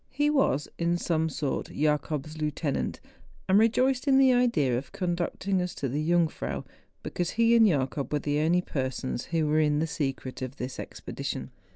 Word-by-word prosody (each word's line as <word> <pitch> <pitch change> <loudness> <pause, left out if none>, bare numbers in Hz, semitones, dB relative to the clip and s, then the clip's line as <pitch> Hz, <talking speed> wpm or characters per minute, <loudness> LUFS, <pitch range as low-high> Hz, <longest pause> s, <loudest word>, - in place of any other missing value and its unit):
He 290 +2 +1
was, 270 - +2
in 170 +1 +1
some 160 -2 0
sort, 140 -1 -2
Jacob's 150 0 -1
lieutenant, 150 -1 -2 0.5
and 190 +2 +5
rejoiced 255 +4 +2
in 270 -1 +5
tlie 265 -2 +6
idea 170 - +2
of 130 +2 -4
conducting 180 +1 -1
us 180 -1 -3
to 140 - -2
the 145 +4 -2
Jungfrau, 170 0 0 0.4
be¬ - - -6
cause 175 -1 -1
he 230 0 +5
and 225 -2 +7
Jacob 140 -4 -1
were 150 - +2
the 145 +1 -1
only 170 +4 +3
persons 130 -4 -3
who 165 -3 0
were 150 +1 +2
in 150 -1 +3
the 155 - +1
secret 135 -4 -4
of 130 +1 -5
this 125 -2 -6
expedition. 140 -1 -5
155 Hz, 180 wpm, -28 LUFS, 140-185 Hz, 0.5 s, and